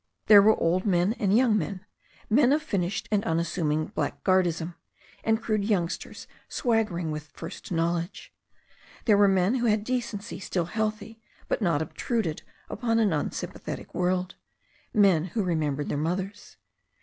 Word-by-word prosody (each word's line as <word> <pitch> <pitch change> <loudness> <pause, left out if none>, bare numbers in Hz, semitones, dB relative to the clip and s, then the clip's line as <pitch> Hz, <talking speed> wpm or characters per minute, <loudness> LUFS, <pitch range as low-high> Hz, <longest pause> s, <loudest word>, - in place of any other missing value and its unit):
There 205 -2 +9
were 215 +2 +4
old 180 +3 +1
men 185 0 +2
and 200 +1 +3
young 240 -3 +4
men; 195 -1 -5 0.4
men 250 +3 +4
of 305 +1 +1
finished 195 - -2
and 210 -1 +2
unassuming 160 -2 0
blackguardism, 175 -3 0 0.5
and 220 0 +2
crude 215 -3 -1
youngsters 190 -5 -2 0.2
swagger 225 -7 0
ing 165 -3 -2
with 150 -1 -6
first 165 - -8
knowledge. 170 +1 -2 0.7
There 215 - +5
were 200 0 +5
men 190 +2 +3
who 240 -1 +1
had 210 -1 +2
decency 235 -3 -3
still 180 -3 -2
healthy, 215 +3 -3 0.3
but - - -1
not 165 -6 +2
obtruded 170 - -2 0.3
upon 230 -2 -1
an 215 -6 +3
unsympathetic 150 - -4
world; 180 0 0 0.6
men 190 -6 +4
who 200 +4 -2
remembered 150 -5 -1
their 145 - -1
mothers. 185 +6 -4
190 Hz, 145 wpm, -27 LUFS, 170-220 Hz, 0.7 s, There